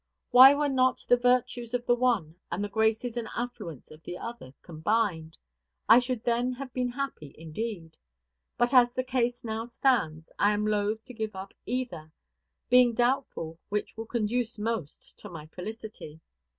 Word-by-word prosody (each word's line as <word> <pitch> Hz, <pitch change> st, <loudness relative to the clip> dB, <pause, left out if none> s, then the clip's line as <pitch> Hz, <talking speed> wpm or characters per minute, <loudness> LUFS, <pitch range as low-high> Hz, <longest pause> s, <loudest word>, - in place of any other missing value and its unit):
Why 265 Hz, +3 st, +10 dB
were 295 Hz, 0 st, +1 dB
not 255 Hz, -2 st, +1 dB
the 245 Hz, -, +6 dB
virtues 245 Hz, -1 st, +1 dB
of 245 Hz, 0 st, -3 dB
the 240 Hz, -, +4 dB
one 235 Hz, -10 st, +1 dB, 0.2 s
and 180 Hz, +4 st, -2 dB
the 205 Hz, -, -3 dB
graces 220 Hz, +3 st, 0 dB
and 230 Hz, -2 st, -3 dB
affluence 230 Hz, -, -6 dB
of 155 Hz, +1 st, -13 dB
the 175 Hz, -, -7 dB
other 230 Hz, -, -8 dB
combined? 165 Hz, -1 st, -1 dB, 0.5 s
I 235 Hz, -, +9 dB
should 250 Hz, -2 st, -3 dB
then 240 Hz, +1 st, +1 dB
have 255 Hz, 0 st, -8 dB
been 250 Hz, -1 st, -1 dB
happy 245 Hz, -, -5 dB
indeed. 165 Hz, +1 st, -6 dB, 0.6 s
But, 240 Hz, +2 st, +2 dB
as 245 Hz, -2 st, +5 dB
the 255 Hz, -, 0 dB
case 245 Hz, -1 st, -1 dB
now 225 Hz, 0 st, -3 dB
stands, 235 Hz, -, 0 dB
I 205 Hz, +1 st, +4 dB
am 210 Hz, 0 st, -1 dB
loath 215 Hz, +1 st, 0 dB
to 250 Hz, -, -10 dB
give 220 Hz, -3 st, -4 dB
up 190 Hz, +1 st, -8 dB
either; 240 Hz, -12 st, -4 dB, 0.6 s
being 245 Hz, -1 st, +5 dB
doubtful 240 Hz, -10 st, -1 dB
which 210 Hz, +1 st, -3 dB
will 225 Hz, 0 st, -6 dB
conduce 235 Hz, +1 st, -1 dB
most 210 Hz, -8 st, -4 dB
to 210 Hz, -, -9 dB
my 160 Hz, -4 st, -9 dB
felicity. 185 Hz, -2 st, -8 dB
225 Hz, 165 wpm, -28 LUFS, 195-245 Hz, 0.6 s, Why